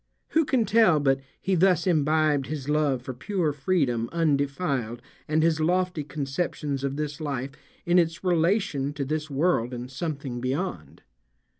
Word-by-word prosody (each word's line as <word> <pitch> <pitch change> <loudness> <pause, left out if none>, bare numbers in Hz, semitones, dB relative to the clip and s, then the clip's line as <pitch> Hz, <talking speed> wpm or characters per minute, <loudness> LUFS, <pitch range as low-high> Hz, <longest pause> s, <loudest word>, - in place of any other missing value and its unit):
Who 320 -1 +2
can 250 -4 +2
tell 195 -6 +4
but 135 -1 +2 0.2
he 190 - -1
thus 180 -1 +3
imbibed 155 -4 +2
his 145 -3 -5
love 145 -4 +1
for 130 - -5
pure 160 +4 -1
freedom 135 -7 0
undefiled 140 -6 0 0.3
and 155 +1 +2
his 160 -1 +2
lofty 180 0 +1
conceptions 140 0 -3
of 140 0 -1
this 150 +1 -4
life 140 -3 -3 0.3
in 175 +1 +4
its 165 +1 0
relation 170 -5 +1
to 140 -2 -3
this 155 +2 -3
world 135 -4 +1
and 125 +1 -7
something 140 -4 -4
beyond? 140 +9 -4
150 Hz, 150 wpm, -26 LUFS, 135-175 Hz, 0.3 s, tell